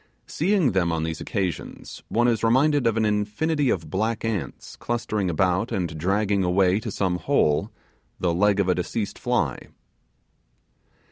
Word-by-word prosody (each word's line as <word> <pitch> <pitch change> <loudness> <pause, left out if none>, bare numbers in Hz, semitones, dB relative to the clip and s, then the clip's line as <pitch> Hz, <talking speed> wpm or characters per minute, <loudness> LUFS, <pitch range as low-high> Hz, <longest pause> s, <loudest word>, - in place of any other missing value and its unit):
Seeing 180 -4 +1
them 90 -3 +1
on 80 -1 -1
these 80 0 -4
occasions, 95 -5 -4
one 120 +1 +2
is 115 -3 +1
reminded 130 +3 +3
of 115 -1 +1
an 110 - +2
infinity 110 +8 0
of 80 -7 -2
black 110 +4 -1
ants 100 -11 -4
clustering 110 -5 -2
about 90 +2 +1
and 85 -4 -2
dragging 100 +3 +1
away 90 +2 +3
to - - -5
some 90 -3 -1
hole 85 - +1 0.5
the 85 -2 +1
leg 100 +3 +2
of 100 - +2
a 90 - +4
deceased 90 +4 -3
fly. - - -1
100 Hz, 150 wpm, -24 LUFS, 90-115 Hz, 0.5 s, a